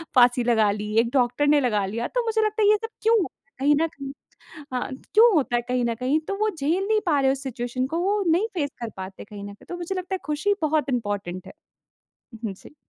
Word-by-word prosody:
फ़ाँसी 245 0 +5
लगा 220 -4 +3
ली, 210 +1 -4
एक 230 0 +2
डॉक्टर 250 +2 +2
ने 295 0 +5
लगा 210 -6 +1
लिया, 230 +5 -3
तो - - -1
मुझे 445 -1 +1
लगता 430 +1 -1
है 410 - +6
ये 425 - +6
सब 450 +2 -6
क्यों? 445 -4 +4 0.3
कहीं 290 +2 +4
न 330 - +3
कहीं 275 -3 -8 0.6
हाँ, 250 - -2 0.2
क्यों 455 +2 +7
होता 270 -6 +2
है 240 - +2
कहीं 250 -1 0
न 235 - 0
कहीं 260 +6 +1
तो 395 - -1
वो 430 +1 +1
झेल 345 +3 -1
नहीं 435 -1 +3
पा 300 -5 +3
रहे 265 0 +4
उस 275 +1 -4
सिचुएशन 250 0 -3
को 325 +4 -3
वो 400 +3 +1
नहीं 385 +7 +2
फेस 290 -4 0
कर 230 - -3
पाते 190 0 -7
कहीं 205 -1 -10
न 200 0 -7
कहीं, - - -18
तो 350 - -4
मुझे 350 +2 -4
लगता 370 +1 -3
है - - -5
खुशी 305 +7 +1
बहुत 305 -2 +1
इम्पॉर्टैंट 205 -7 -3
है। - - -9 0.8
हुँ, 225 - -11
हुँ, 205 - -1
जी। 245 - -16
275 Hz, 245 wpm, -24 LUFS, 235-370 Hz, 0.8 s, क्यों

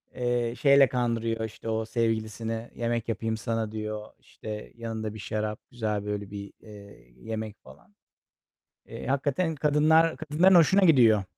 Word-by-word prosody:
Eee, 120 -1 0
şeyle 140 -1 +6
kandırıyor, 115 -2 -1
işte, 110 +1 -8
o 110 0 -1
sevgilisini: 115 0 -2
"Yemek 115 -1 -2
yapayım 110 +1 -2
sana." 115 -1 -2
diyor. 110 -1 -5
İşte, 105 -1 -9
yanında 110 -2 -4
bir 110 - -9
şarap, 105 +1 -3
güzel 105 -4 -2
böyle 105 -1 -4
bir, 100 -1 -8
eee, 100 - -14
yemek 110 - -6
falan. 75 +10 -17 0.9
Eee, - - -8
hakikaten 140 +5 0
kadınlar 155 +3 +3
kadınların 160 +5 +3
hoşuna 175 +4 +6
gidiyor. 115 - +5
115 Hz, 135 wpm, -27 LUFS, 110-125 Hz, 0.9 s, şeyle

